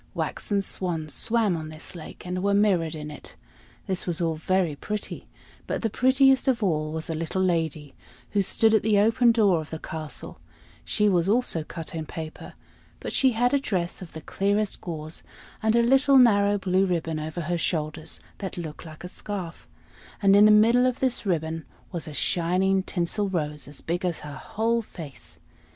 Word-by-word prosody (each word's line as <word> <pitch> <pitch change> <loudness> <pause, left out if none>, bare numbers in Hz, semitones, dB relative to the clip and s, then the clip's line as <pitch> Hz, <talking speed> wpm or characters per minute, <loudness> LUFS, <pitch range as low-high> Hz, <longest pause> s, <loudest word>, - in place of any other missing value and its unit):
Waxen 200 -2 -1
swans 165 -6 -3
swam 225 -5 +1
on 155 -1 -5
this 155 +3 -10
lake, 170 0 -10
and 180 +1 -3
were 200 +1 +2
mirrored 180 -6 +2
in 150 -1 -6
it. 150 - -10 0.5
This 185 -1 -2
was 170 -2 0
all 165 -2 +1
very 170 0 0
pretty; 210 +8 -5 0.4
but - - -2
the 225 - 0
prettiest 265 +3 +4
of 240 -4 +2
all 155 -5 0
was 160 0 -4
a 165 - -2
little 165 +4 -1
lady, 160 -5 -1 0.4
who 205 - +2
stood 220 +3 +3
at 220 - +5
the 215 -1 +2
open 230 +4 +5
door 205 -7 +3
of 155 - -10
the 160 - -5
castle; 155 - -6 0.4
she 210 - +1
was 180 -2 +3
also 220 -8 +1
cut 165 +1 -7
out - - -8
in 160 -1 -4
paper, 160 -2 -7 0.5
but - - -5
she 260 -2 +3
had 245 +3 +2
a 280 - +4
dress 185 -10 -2
of 180 - -10
the 160 - -7
clearest 205 +4 -1
gauze, 155 -2 -6 0.4
and 220 0 +2
a 235 - +5
little 270 +3 +5
narrow 205 -5 +5
blue 190 0 +2
ribbon 165 -3 -1
over 155 +3 -4
her 170 +1 -1
shoulders, 155 -1 -2 0.2
that 190 -3 -5
looked 160 -3 -6
like 155 0 -11
a - - -5
scarf; 185 -2 -6 0.5
and 200 -2 +5
in 205 +1 +8
the - - +7
middle 230 +4 +5
of 255 0 -1
this 255 -5 0
ribbon 160 -2 -1 0.3
was 170 -4 -4
a 155 - -7
shining 185 +4 +1
tinsel 190 +3 -1
rose 150 -5 -3
as 145 0 -10
big 175 +3 -2
as 175 -3 -1
her 150 -1 -8
whole 225 +11 -1
face. 160 - -11
185 Hz, 190 wpm, -26 LUFS, 160-210 Hz, 0.5 s, in